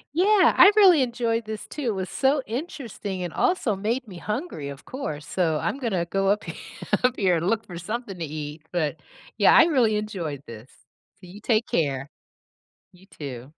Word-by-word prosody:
Yeah, 380 0 +5
I 395 +4 +8
really 375 -8 +7
enjoyed 235 -2 -1
this 215 0 -6
too, 295 - -6
it 220 - 0
was 190 -1 -3
so 270 +4 +1
interesting 230 - -5
and 175 - -5
also 355 - +1
made 225 +6 -2
me 185 -4 -10
hungry, 210 - -4
of 140 0 -10
course, 155 - -5
so, 165 -4 0
I'm 275 - -2
gonna 195 -10 -1
go 195 +2 -1
up 210 +2 +1
he - - -6 0.5
up 250 0 +3
here 185 -4 +2
and 170 - -2
look 225 -1 0
for 175 -2 -8
something 205 +1 -5
to - - -3
eat, 150 0 -6
but, 160 -3 -1 0.4
yeah, - - +6
I - - +9
really 255 -10 +2
enjoyed 175 -10 -4
this. 115 +2 -11 0.5
So 185 - -14
you 200 +4 -12
take 225 0 +2
care. 140 -3 -1 0.8
You 185 +1 -20
too. 130 -5 -6
205 Hz, 190 wpm, -25 LUFS, 170-250 Hz, 0.8 s, I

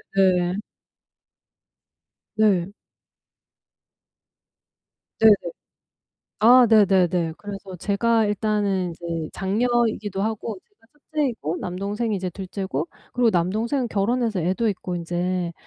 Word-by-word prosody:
네. 180 -2 +3 1.8
네. 200 -3 +2 2.5
네네. 220 -1 +8 1.1
아 245 +3 +7
네네네. 185 -6 +3
그래서 200 -2 -8
제가 220 +4 +1
일단은 205 -3 0
이제 165 -1 -5
장녀이기도 215 -1 0
하고 220 0 -3
제가 410 - -30 0.3
첫째이고 235 - -1
남동생이 205 +5 -3
이제 185 -1 -3
둘째고 190 -4 -4 0.3
그리고 245 -2 +3
남동생은 220 +9 0
결혼해서 220 -1 0
애도 190 +7 0
있고 180 -3 -3
인제 175 +1 -2
200 Hz, 220 characters per minute, -23 LUFS, 180-220 Hz, 2.5 s, 네네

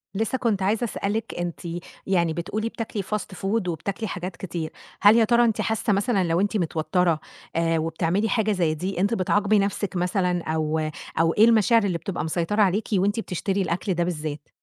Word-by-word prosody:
لسّه 225 +5 0
كنت 220 -6 0
عايزة 210 +5 +1
أسألِك، 215 -1 -2
أنتِ 175 -1 -3 0.5
يعني 170 -4 +2
بتقولي 210 +7 -3
بتاكلي 220 -3 -4
fast 205 -1 -4
food 195 0 -1
وبتاكلي 195 +7 -3
حاجات 180 -1 -5
كتير، 170 -4 -4 0.3
هل 205 +2 +8
يا 230 - +6
ترى 235 +2 +4
أنتِ 225 - +1
حاسّة 220 -1 0
مثلًا 200 -1 +1
لو 170 +1 +1
أنتِ 205 +2 +1
متوتَّرة 170 -1 +1 0.4
آآ 165 0 +2
وبتعملي 165 +6 0
حاجة 215 0 +1
زي 170 -5 +1
دي، 180 +3 -3
أنتِ 200 +4 +2
بتعاقبي 205 +1 +2
نَفْسِك 200 0 -1
مثلًا 180 -1 0
أو 155 0 -1 0.4
أو 165 0 +3
إيه 215 - +6
المشاعر 230 0 +4
اللي 185 -4 0
بتبقى 170 0 -4
مسيطرة 170 +6 0
عليكِ 200 +2 +2
وأنتِ 205 +3 +2
بتشتري 195 -1 -2
الأكل 185 +2 -1
ده 175 0 0
بالذات؟ 155 -4 -4
190 Hz, 180 wpm, -24 LUFS, 170-210 Hz, 0.5 s, هل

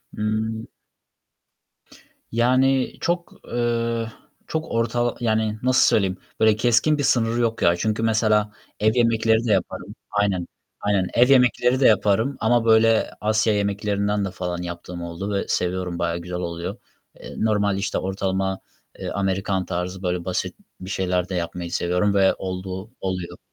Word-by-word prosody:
Imm 110 +2 -2 1.6
Yani, 130 +3 +2
çok, 175 0 -2
eee, 115 -1 -1 0.4
çok 160 0 -3
ortal 115 +1 0
Yani, 110 -2 0
nasıl 130 +1 +4
söyleyeyim? 95 -3 +2 0.2
Böyle, 110 -1 +5
keskin 120 +6 +3
bir 145 - -1
sınırı 120 -2 +2
yok, 115 -1 0
ya. 85 - +4
Çünkü 110 +5 -1
mesela, 110 -1 +2 0.3
ev 110 +1 +3
yemekleri 115 -1 +3
de 115 - +1
yaparım 95 -3 -2 0.2
Aynen, 100 -4 0 0.3
aynen. 100 -2 +1
Ev 125 +2 +5
yemekleri 125 -1 +4
de 135 - +6
yaparım 105 +6 +2
ama 115 +1 +2
böyle, 110 0 +4
Asya 110 +1 +2
yemeklerinden 100 0 0
de 95 - -4
falan 90 -2 -4
yaptığım 85 0 -7
oldu 85 +4 -5
ve 100 - -1
seviyorum. 90 -1 -1
Bayağı 85 0 0
güzel 90 +1 -5
oluyor. 85 -1 -4 0.4
Eee, - - -10
normal, 105 -2 +1
işte, 100 - -2
ortalama, 95 0 -1 0.4
eee, - - -4
Amerikan 95 -1 -1
tarzı, 90 +1 -4
böyle, 90 -1 -1
basit 90 - -2 0.2
bir 95 - -8
şeyler 90 -2 -1
de 95 - -3
yapmayı 85 0 -4
seviyorum 90 +3 +1
ve 95 -1 +4
olduğu 95 +2 -6
oluyor. 90 -2 -4
105 Hz, 145 wpm, -23 LUFS, 95-115 Hz, 1.6 s, de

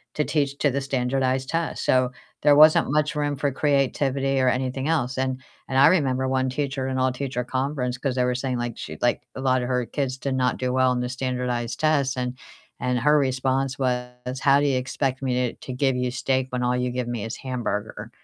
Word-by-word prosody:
to 150 - +1
teach 140 -2 -1
to 145 - +2
the 140 +2 -1
standardized 130 0 0
test. 165 0 -2
So, 130 -1 +3 0.3
there 145 - +6
wasn't 155 -2 +6
much 150 +1 +1
room 145 -1 0
for 140 +1 -1
creativity 135 -1 +1
or 130 -1 +3
anything 130 +2 -1
else, 135 -6 0
and 130 0 -1 0.3
and 130 - -1
I 135 - +8
remember 130 -7 +2
one 130 0 +1
teacher 135 0 -2
in 130 0 -2
all-teacher 130 0 -1
conference, 130 0 -2
'cause 130 -2 -1
they 125 - +2
were 125 - +1
saying, 130 0 -2
like, 120 -1 -4
she - - -7
like 120 - +2
a 130 - -5
lot 130 -1 +2
of 125 - -3
her 125 -1 0
kids 130 0 -3
did 135 +1 -3
not 125 -1 +1
do 125 -1 -1
well 130 0 +3
on 125 -1 0
the 125 - -2
standardized 125 -2 -2
tests 140 -4 +2
and 125 0 -2 0.5
and 125 0 0
her 150 +5 +4
response 135 0 0
was, 125 0 -3
"How 140 +1 +4
do - - +1
you 135 -2 +2
expect 130 +1 -2
me 130 -2 -1 0.2
to - - -17
to 130 - -4
give 135 0 +1
you 125 0 0
steak 130 +1 0
when 125 0 -2
all 125 0 +1
you 125 0 0
give 125 -1 -3
me 115 -3 -3
is 115 - -5
hamburger?" 120 -5 -4
130 Hz, 220 wpm, -24 LUFS, 125-135 Hz, 0.5 s, I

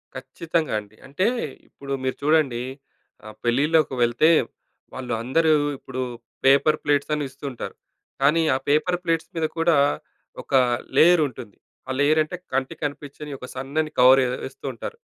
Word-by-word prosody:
ఖచ్చితంగా 155 +3 -3
అండి. 105 +1 -15
అంటే 145 +8 -1 0.4
ఇప్పుడు 140 0 -7
మీరు 130 - -1
చూడండి 145 -6 +2 0.6
ఆహ్, 110 - -10
పెళ్ళిలోకి 140 +4 +2
వెళ్తే, 120 +6 +3 0.7
వాళ్ళు 125 -2 -4
అందరూ 160 +7 +2 0.3
ఇప్పుడు 130 -1 -6 0.4
పేపర్ 140 +3 +5
ప్లేట్సని 145 +1 +1
ఇస్తూ 140 - -12
ఉంటారు. 125 - -7 0.5
కానీ, 150 +4 +4
ఆ - - +2
పేపర్ 165 +5 +2
ప్లేట్స్ 165 -2 -1
మీద 160 - 0
కూడా, 165 -1 +3 0.6
ఒక - - -12 0.4
లేయర్ 175 0 +6
ఉంటుంది. 110 -6 -11 0.3
ఆ - - -3
లేయర్ 150 +2 +4
అంటే 165 +4 -7 0.2
కంటికి 135 0 -2
కనిపించని 145 0 -6
ఒక 125 - -9
సన్నని 150 +4 -2
కవర్ 130 +2 +7 0.2
వేస్తూ 135 +1 -9
ఉంటారు. 460 - -7
145 Hz, 140 wpm, -23 LUFS, 130-155 Hz, 0.7 s, కవర్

